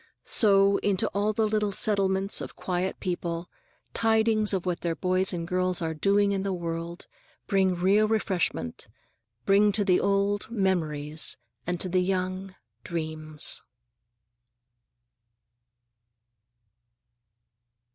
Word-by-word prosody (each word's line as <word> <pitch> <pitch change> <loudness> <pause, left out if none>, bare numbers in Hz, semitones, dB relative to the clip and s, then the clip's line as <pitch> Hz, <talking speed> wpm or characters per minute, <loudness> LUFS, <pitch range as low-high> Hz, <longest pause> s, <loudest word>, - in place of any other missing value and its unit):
So, 200 -3 +4
into 200 -2 0
all 205 +2 0
the 215 0 +1
little 210 -1 0
settlements 195 -1 +1
of - - -7
quiet 185 +1 -3
people, 175 -1 -4 0.4
tidings 220 -1 +2
of 190 -3 -1
what 180 -1 -2
their 170 -1 -1
boys 185 +3 +1
and 170 -2 -4
girls 185 -1 0
are 160 -1 -2
doing 200 +5 +2
in 195 -1 -1
the 195 0 -2
world 170 0 -5 0.4
bring 190 -2 +2
real 195 +5 +3
refreshment; 190 - -1 0.6
bring 205 +1 +4
to 205 0 +1
the 180 -2 +4
old, 200 +1 0
memories, 160 -8 +1 0.3
and 175 -1 -2
to 185 - -2
the 185 0 +1
young, 185 0 -2 0.3
dreams. 155 -2 -4
190 Hz, 115 wpm, -27 LUFS, 175-200 Hz, 0.6 s, So